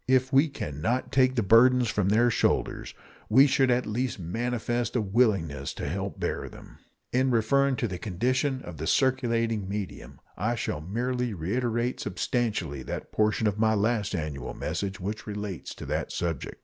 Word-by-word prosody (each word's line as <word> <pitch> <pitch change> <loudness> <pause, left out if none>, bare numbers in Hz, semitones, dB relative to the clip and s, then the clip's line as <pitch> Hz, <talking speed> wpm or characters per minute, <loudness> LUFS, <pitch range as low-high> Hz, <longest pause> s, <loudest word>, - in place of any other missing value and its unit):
If 130 +1 +2
we 140 +4 +5
can 75 - -6
not 125 +8 0
take 130 -1 +3
the 115 - +1
burdens 125 +4 +5
from 105 -3 0
their 120 +4 +4
shoulders, - - 0 0.3
we 130 +6 +7
should 135 -2 +3
at 125 0 +2
least 120 +4 -2
manifest 120 +5 -2
a 120 - +2
willingness 95 - +1
to - - -4
help 95 +5 -3
to - - -18
bear - - -2
them. - - -14 0.3
In 130 +1 +3
referring 135 +4 +3
to 120 0 -1
the 90 -3 -5
condition 130 - -1
of 85 -2 -8
the 80 +2 -4
circulating 115 -6 +1
medium, 90 -11 -6 0.2
I 115 +6 -1
shall 75 -9 -3
merely 120 +5 -2
reiterate 120 +7 -1
substantially 105 - -2
that - - -6
portion 110 +1 +1
of 105 0 0
my 110 0 +3
last 105 -1 0
annual 75 -6 -4
message 100 -1 -3
which 105 +5 -5
relates 105 -3 -5
to - - -8
that - - -2
subject. 85 -5 -3
110 Hz, 175 wpm, -27 LUFS, 95-125 Hz, 0.3 s, we